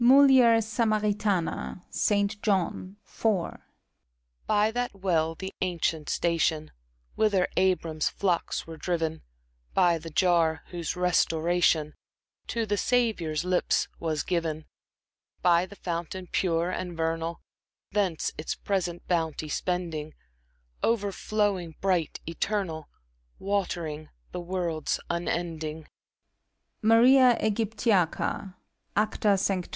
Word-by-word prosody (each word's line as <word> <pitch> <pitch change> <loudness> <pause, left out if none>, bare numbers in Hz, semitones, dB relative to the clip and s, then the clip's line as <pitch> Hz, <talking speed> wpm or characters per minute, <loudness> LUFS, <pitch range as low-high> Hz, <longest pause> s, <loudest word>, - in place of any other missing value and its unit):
— - - +2
MULIER 255 -3 +7
SAMARITANA. 210 -5 0
(St, 205 0 +1
John, 190 -2 -1
iv.) 205 -6 -1 0.9
By 215 +1 +3
that 245 -1 -2
well, 165 -4 0
the 190 +3 -6
ancient 165 -4 -1
station 160 -2 0 0.4
Whither 205 -4 +2
Abram's 170 -5 +1
flocks 180 -4 -1
were 165 -1 -9
driven; 160 -1 -2 0.5
By 170 -2 +4
the 165 +1 -8
jar, 165 -2 +2
whose 170 -2 -3
restoration 170 -3 +2 0.5
To 230 -1 -1
the 205 -1 0
Saviour's 200 -11 +1
lips 180 0 +1
was 155 -3 -1
given 165 -3 -1
j - - -24 0.8
By 175 0 +4
the 200 - -12
fountain, 175 0 -4
pure 170 -1 +1
and 180 -2 -4
vernal, 165 +1 -2 0.5
Thence 190 -6 0
its 155 - -3
present 180 -3 -2
bounty 160 -3 -1
spending, 165 -3 -3 0.3
— - - -41
Overflowing, 200 -4 -1
bright, 180 -5 0
eternal, 165 -2 -2 0.5
Watering 170 -6 -2 0.2
the 180 - -4
worlds 170 -3 -2
unending! 165 -2 -3 0.5
— - - -51
MARIA 245 +2 +6
iBGYPTiACA. 205 -3 0 0.4
(Acta 210 -1 +2
Sanctorum.) 190 -2 -1
180 Hz, 105 wpm, -27 LUFS, 165-205 Hz, 0.9 s, MULIER